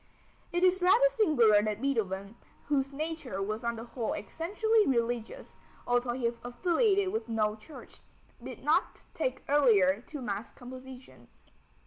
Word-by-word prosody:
It 350 +1 0
is 370 0 +4
rather 420 +8 +5
singular 290 - +4
that 210 0 -2
Beethoven, 210 -6 -2 0.3
whose 275 -2 +1
nature 300 - -4
was 215 +4 -3
on 235 0 -1
the 225 - -7
whole 235 -1 -4
essentially 420 - 0
religious, 240 - -2 0.3
although 245 0 +1
he 245 -1 -3 0.2
affiliated 375 - +1
with 440 - -3
no 215 -2 0
church, 220 +8 -13 0.4
did - - -9
not - - +1
take - - -3
earlier 220 -9 +4
to 300 - -7
mass 210 -3 -4
composition. 255 +1 -12
250 Hz, 135 wpm, -30 LUFS, 220-330 Hz, 0.4 s, rather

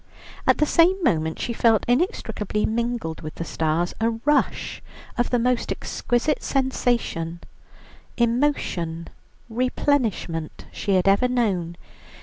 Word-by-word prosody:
At - - +5
the 300 - +3
same 335 +4 +4
moment 160 - +1
she 235 - -2
felt 225 -2 +3
inextricably 225 - 0
mingled 235 -7 -2
with 155 0 -7
the - - -4
stars, 160 +2 0
a 225 - +3 0.2
rush 295 0 +1 0.3
of 240 - 0
the 245 - +2
most 245 0 0
exquisite 245 +5 -1
sensation, 240 -11 -1 0.8
emotion, 230 - 0 0.4
replenishment 230 - -1
she 200 - -1
had 185 +1 +2
ever 200 +6 +4
known. 195 -9 0
230 Hz, 120 wpm, -24 LUFS, 170-250 Hz, 0.8 s, At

